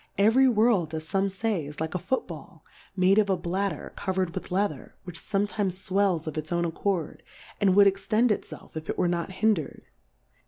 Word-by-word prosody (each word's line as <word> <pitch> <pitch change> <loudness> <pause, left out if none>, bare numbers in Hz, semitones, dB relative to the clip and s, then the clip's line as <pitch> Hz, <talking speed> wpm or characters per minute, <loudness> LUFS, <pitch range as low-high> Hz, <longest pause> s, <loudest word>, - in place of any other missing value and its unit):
Every 225 +7 +5
World, 210 -8 +2
as 155 0 -5
fome 195 +3 0
fay, 190 -6 -2
is 150 - -9
like 160 0 -3
a 180 - -1
Foot 260 +9 -1
Ball, - - -11 0.3
made 190 +2 +4
of 205 -2 +2
a 190 - +2
Bladder, 175 -1 -3
coverM 185 -2 -1
with - - -6
Leather, 185 -7 -2
which 175 -2 -7
fometimes 205 -1 -1
fwellsofits 165 -6 0
own 170 0 +1
accord, 170 0 -2 0.4
and 195 -2 +3
would 200 0 +7
extend 215 +4 +2
it 210 - +1
felf, - - -12
if 160 0 -6
it - - -2
were 180 - +2
not 175 +1 -2
hin 220 +3 +3
dred. 160 -8 -6
190 Hz, 190 wpm, -27 LUFS, 170-205 Hz, 0.4 s, would